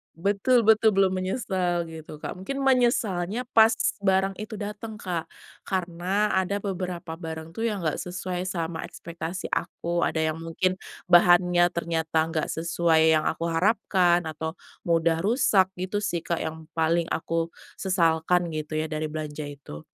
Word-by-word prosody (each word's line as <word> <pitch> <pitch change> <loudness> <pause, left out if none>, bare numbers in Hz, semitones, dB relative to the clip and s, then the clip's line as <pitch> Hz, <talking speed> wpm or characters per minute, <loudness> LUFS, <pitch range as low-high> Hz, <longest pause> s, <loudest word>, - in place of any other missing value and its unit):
Betul 205 +6 +2
betul, 220 0 +6
belum 190 -1 +3
menyesal, 185 -5 -1
gitu, 160 -2 -9
Kak. - - -5
Mungkin 275 +10 -5
menyesalnya 240 -5 +1
pas 220 0 +8 0.3
barang 190 0 +2
itu 215 0 -7
dateng 210 +1 -6
Kak, 175 -3 -3 0.4
karena 185 +2 -1
ada 190 +2 0
beberapa 180 -4 -4
barang 160 -1 -7
tuh 225 - -3
yang 210 -4 0
enggak 155 -3 -1
sesuai 180 0 -4
sama 170 -3 -3
ekspektasi 170 +2 -6
aku, 170 0 -2
ada 160 - 0
yang 160 0 0
mungkin 165 +3 -1 0.3
bahannya 175 0 +6
ternyata 160 -1 0
enggak 160 -1 -2
sesuai 160 -1 +3
yang 155 - +1
aku 165 +1 -1
harapkan, 175 -1 +2
atau 160 +1 -4 0.3
mudah 165 0 +2
rusak, 205 -4 +3
gitu 195 +3 -2
sih, 170 -4 -1
Kak, 170 +1 -2
yang 160 0 -6
paling 165 +1 +2
aku 165 0 -1 0.3
sesalkan 175 -2 +2
gitu 155 0 -4
ya, 155 0 -2
dari 155 0 -2
belanja 150 -1 -5
itu. 140 - -10
175 Hz, 145 wpm, -26 LUFS, 160-195 Hz, 0.4 s, pas